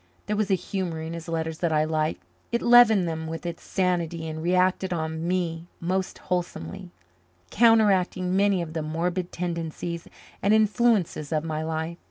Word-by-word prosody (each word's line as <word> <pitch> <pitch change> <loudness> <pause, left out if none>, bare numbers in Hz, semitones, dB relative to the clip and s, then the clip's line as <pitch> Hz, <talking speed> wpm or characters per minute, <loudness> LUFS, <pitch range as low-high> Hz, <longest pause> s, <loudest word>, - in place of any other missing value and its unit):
There 210 - -1
was 210 -1 0
a 195 - +4
humour 180 -3 -3
in 160 +1 -5
his 165 0 -7
letters 160 -1 -3
that 170 -2 0
I 155 -1 +3
liked; 155 0 -1 0.3
it 235 - 0
leavened 235 -6 +6
them 160 -1 -3
with 165 +2 -6
its 170 -1 -5
sanity 170 -3 -1
and 160 0 -5
reacted 185 +2 +2
on 160 -1 -2
me 170 -2 -1
most 185 +2 -2
wholesomely, 180 +1 -4 0.6
counteracting 195 -5 +3
many 195 -2 +3
of 160 -1 -8
the 160 - -2
morbid 170 +4 -2
tendencies 170 -1 -4 0.3
and 205 +2 +4
influences 215 - +2
of 155 -1 0
my 155 -1 -3
life. 160 +2 -3
175 Hz, 165 wpm, -26 LUFS, 160-190 Hz, 0.6 s, leavened